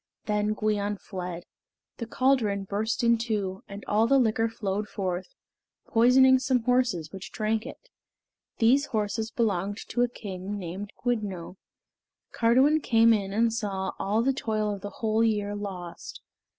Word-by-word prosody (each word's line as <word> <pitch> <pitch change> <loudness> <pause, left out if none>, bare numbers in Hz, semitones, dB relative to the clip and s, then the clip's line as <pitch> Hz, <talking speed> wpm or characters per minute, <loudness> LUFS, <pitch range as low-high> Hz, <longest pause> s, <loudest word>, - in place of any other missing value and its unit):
Then 210 0 0
Gwion 210 -1 -1
fled. 180 -3 -6 0.5
The 230 - -5
caldron 230 -7 +1
burst 210 +5 -2
in 235 -1 +4
two, 205 -5 -2
and 200 0 -9
all 215 +2 +2
the 275 - +4
liquor 225 -2 +2
flowed 210 -2 -3
forth, 185 -3 -4 0.5
poisoning 260 +3 +5
some 255 -2 +1
horses 235 -11 +1
which 195 0 -8
drank 220 +2 -1
it. - - -11 0.7
These 265 +5 +4
horses 220 0 -2
belonged 205 -4 -1
to 240 - 0
a 245 - +3
king 200 -3 -6
named 195 +2 -6
Gwyddno. 200 -7 -2 0.7
Cardiwen 260 +7 +3
came 230 -3 +5
in 200 -3 -1
and 225 +2 +2
saw 195 -4 -2
all 210 +4 +1
the 270 +2 +2
toil 215 -4 -1
of 200 - -7
the 205 - -5
whole 220 +2 0
year 205 -2 0
lost. 185 -4 -7
215 Hz, 150 wpm, -27 LUFS, 200-235 Hz, 0.7 s, poisoning